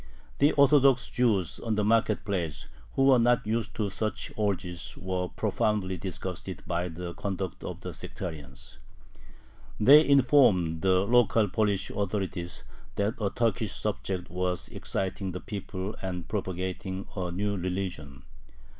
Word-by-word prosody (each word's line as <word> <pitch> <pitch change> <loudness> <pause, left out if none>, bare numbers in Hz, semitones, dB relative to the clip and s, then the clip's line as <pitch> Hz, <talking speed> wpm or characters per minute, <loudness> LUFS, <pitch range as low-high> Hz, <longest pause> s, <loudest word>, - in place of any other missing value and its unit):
The 145 +2 +5
Orthodox 140 -2 +5
Jews 105 -8 +1
on 115 -2 -1
the 105 - +1
market 110 -1 +2
place, 85 -8 -3 0.3
who 135 - +3
were 130 -2 +6
not 120 0 +3
used 110 0 -2
to 105 -3 -1
such 110 +4 -3
orgies, 90 -5 -2
were 90 -1 -2
profoundly 105 -3 0
disgusted 95 +1 -6
by 85 0 -1
the 85 +1 -6
conduct 95 -3 -4
of - - -6
the - - -6
sectarians. 75 -8 -8 1.0
They 145 +8 +8
informed 125 - +4
the 95 -1 +4
local 115 0 +4
Polish 100 -2 0
authorities 95 -4 -3 0.3
that 100 +2 0
a 100 - +1
Turkish 115 -1 0
subject 95 -4 -3
was 90 0 -2
exciting 95 -1 -3
the 90 - -4
people 100 -1 -5
and 90 -3 -4
propagating 95 -1 -3
a 90 -3 -2
new 100 +3 -1
religion. 90 -7 -4
95 Hz, 135 wpm, -28 LUFS, 90-110 Hz, 1.0 s, They